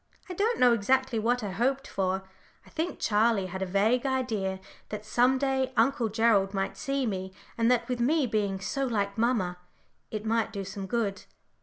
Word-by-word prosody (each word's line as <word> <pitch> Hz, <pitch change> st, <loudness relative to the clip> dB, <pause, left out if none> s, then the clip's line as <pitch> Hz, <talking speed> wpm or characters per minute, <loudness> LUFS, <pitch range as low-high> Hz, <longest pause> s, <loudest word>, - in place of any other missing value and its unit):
I 365 Hz, -, -5 dB
don't 430 Hz, +6 st, +1 dB
know 245 Hz, -1 st, +6 dB
exactly 250 Hz, +2 st, +1 dB
what 240 Hz, +2 st, +1 dB
I 200 Hz, -, -3 dB
hoped 265 Hz, +7 st, 0 dB
for 190 Hz, 0 st, -1 dB, 0.4 s
I -, -, -18 dB
think 340 Hz, +2 st, -3 dB
Charlie 215 Hz, -2 st, +2 dB
had 190 Hz, +1 st, -6 dB
a 190 Hz, -, -1 dB
vague 215 Hz, +6 st, +2 dB
idea 225 Hz, -8 st, -1 dB, 0.3 s
that 210 Hz, 0 st, -6 dB
some 245 Hz, +4 st, +3 dB
day 265 Hz, -1 st, 0 dB
Uncle 230 Hz, 0 st, +2 dB
Gerald 210 Hz, -3 st, +2 dB
might 195 Hz, 0 st, -1 dB
see 275 Hz, -2 st, -1 dB
me, 190 Hz, -3 st, -4 dB, 0.2 s
and 230 Hz, 0 st, +2 dB
that 240 Hz, -1 st, +2 dB
with 250 Hz, -2 st, -2 dB
me 285 Hz, +4 st, +2 dB
being 205 Hz, -4 st, -1 dB
so 275 Hz, +8 st, -2 dB
like 200 Hz, -4 st, -1 dB
mamma 220 Hz, -7 st, 0 dB, 0.5 s
it 215 Hz, 0 st, -5 dB
might 225 Hz, 0 st, +1 dB
do 200 Hz, -2 st, -5 dB
some 195 Hz, 0 st, -6 dB
good. 205 Hz, -2 st, -2 dB
225 Hz, 185 wpm, -28 LUFS, 195-255 Hz, 0.5 s, know